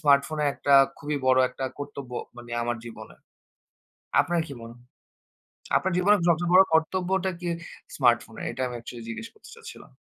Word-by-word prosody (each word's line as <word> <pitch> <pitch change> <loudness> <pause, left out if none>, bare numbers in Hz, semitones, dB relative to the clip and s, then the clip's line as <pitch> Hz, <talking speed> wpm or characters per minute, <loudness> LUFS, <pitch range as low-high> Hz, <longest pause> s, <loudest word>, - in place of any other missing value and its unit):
স্মার্টফোনের 145 +1 +3
একটা 140 - +2 0.2
খুবই 145 0 -3
বড় 130 0 +5
একটা 130 +1 -5
কর্তব্য 140 -3 -7 0.3
মানে, 120 0 -11
আমার 120 0 -1
জীবনে। 110 -2 -10 1.1
আপনার 170 -1 0
কি - - -6
মন 115 0 -9 1.1
আপনার 190 0 -2
জীবনের 200 +2 +4
সবচেয়ে 170 +1 +2
বড় 185 - +10
কর্তব্যটা 185 +3 +1
কি 175 - -3 0.5
স্মার্টফোনের? 120 -4 +1
এটা 130 - -4
আমি 125 - -5
অ্যাকচুয়ালি 120 0 -9
জিজ্ঞেস 230 - -6
করতে 435 - -16
চাচ্ছিলাম। 455 -1 -12
145 Hz, 150 wpm, -26 LUFS, 120-175 Hz, 1.1 s, বড়